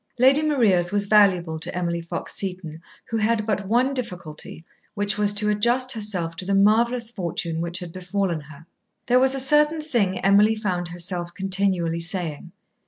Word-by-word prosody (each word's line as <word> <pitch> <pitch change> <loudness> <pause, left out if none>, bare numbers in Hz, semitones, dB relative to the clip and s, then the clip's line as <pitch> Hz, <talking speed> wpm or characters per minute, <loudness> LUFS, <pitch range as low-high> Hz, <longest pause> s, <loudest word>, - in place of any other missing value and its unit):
Lady 265 +4 +5
Maria's 215 - +2
was 205 0 0
valuable 185 -6 +3
to 165 - -5
Emily 170 -1 -2
Fox 165 - -6
Seton, 180 -5 -4 0.3
who 225 - 0
had 220 0 0
but 205 -2 -2
one 250 +6 +2
difficulty, 175 - -7 0.3
which 205 0 0
was 210 -1 +2
to 210 +1 0
adjust 240 +5 +1
herself 200 -8 0
to 185 - -5
the 195 +2 -1
marvellous 230 +4 +2
fortune 170 -5 -4
which 170 +1 -3
had 175 -3 -8
befallen 185 -2 -2
her. 150 +1 -14 0.4
There 250 +1 +3
was 265 +1 +3
a - - -2
certain 300 +3 +3
thing 215 -11 0
Emily 205 +3 +4
found 185 -5 -2
herself 175 0 -4
continually 190 -3 0
saying. 170 -3 -1
195 Hz, 170 wpm, -23 LUFS, 175-225 Hz, 0.4 s, Lady